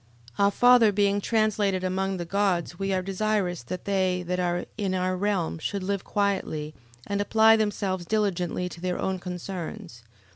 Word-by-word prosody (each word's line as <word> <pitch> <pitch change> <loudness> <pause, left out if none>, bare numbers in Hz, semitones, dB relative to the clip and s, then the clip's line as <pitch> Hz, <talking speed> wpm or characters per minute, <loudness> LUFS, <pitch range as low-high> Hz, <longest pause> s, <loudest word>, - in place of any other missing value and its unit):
11:23. - - +4
Our - - +5
father 245 0 +5
being 200 0 +2
translated 210 -4 +1
amongst 190 +1 -1
the 175 - -4
gods 180 -2 0
we 195 0 -1
are 185 -1 0
desirous 195 -3 -1
that 180 +10 -7
they 185 -2 +1
that 180 +1 -2
are 175 0 -1
in 195 -3 -1
our 185 0 0
realm 185 -4 -1
should 195 +4 -3
live 200 0 -2
quietly, 190 -7 -1 0.3
and 200 0 -1
apply 220 +2 +5
themselves 200 -4 -1
diligently 180 -4 0
to 170 -1 -10
their 180 0 -1
own 190 -1 -1
concerns. 180 - -6
190 Hz, 170 wpm, -26 LUFS, 180-205 Hz, 0.3 s, Our